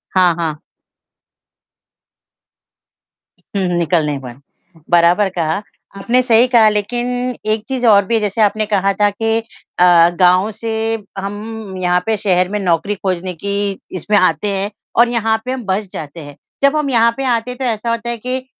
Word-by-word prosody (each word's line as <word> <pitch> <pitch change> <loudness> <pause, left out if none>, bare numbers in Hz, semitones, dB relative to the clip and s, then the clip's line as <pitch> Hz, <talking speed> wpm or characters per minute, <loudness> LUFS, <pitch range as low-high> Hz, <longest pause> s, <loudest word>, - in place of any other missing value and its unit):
हाँ, 180 -2 +4
हाँ। 160 -3 -3 3.0
हुँ, 195 - 0
हुँ, 175 -1 -1
निकल 170 -1 +1
नहीं 145 -2 -2
पाए, 125 -3 -9 0.5
बराबर 175 +4 +4
कहा। 170 0 -2 0.4
आपने 240 +6 +2
सही 240 -1 +4
कहा 235 -3 +5
लेकिन 215 +4 -1 0.4
एक 215 -1 0
चीज़ 260 -2 -2
और 200 -3 +5
भी 230 +3 +1
जैसे 210 +1 -1
आपने 215 +1 +2
कहा 200 -2 +1
था 205 - +5
कि 225 +2 -1 0.4
अ, 175 -1 +6
गाँव 185 +3 +4
से 225 +2 -6 0.5
हम 205 +1 -6
यहाँ 180 -1 +1
पे 225 - +1
शहर 185 -3 +1
में 210 +1 -2
नौकरी 185 +2 0
खोजने 185 -2 -3
की 200 +2 -3 0.2
इसमें 205 +4 +1
आते 190 +2 +2
हैं 195 +2 -3 0.3
और 235 0 +6
यहाँ 225 -2 +1
पे 255 - -3
हम 260 -2 -4
बस 195 +2 -1
जाते 155 +2 -7
हैं। 145 -2 -10 0.3
जब 280 +2 +4
हम 300 -2 0
यहाँ 230 -2 +4
पे 270 - -3
आते 240 -1 0
हैं 250 - -9
तो 265 - -3
ऐसा 230 -1 -2
होता 230 0 -2
है 235 - -3
कि 255 +3 -4
205 Hz, 175 wpm, -17 LUFS, 180-230 Hz, 3.0 s, अ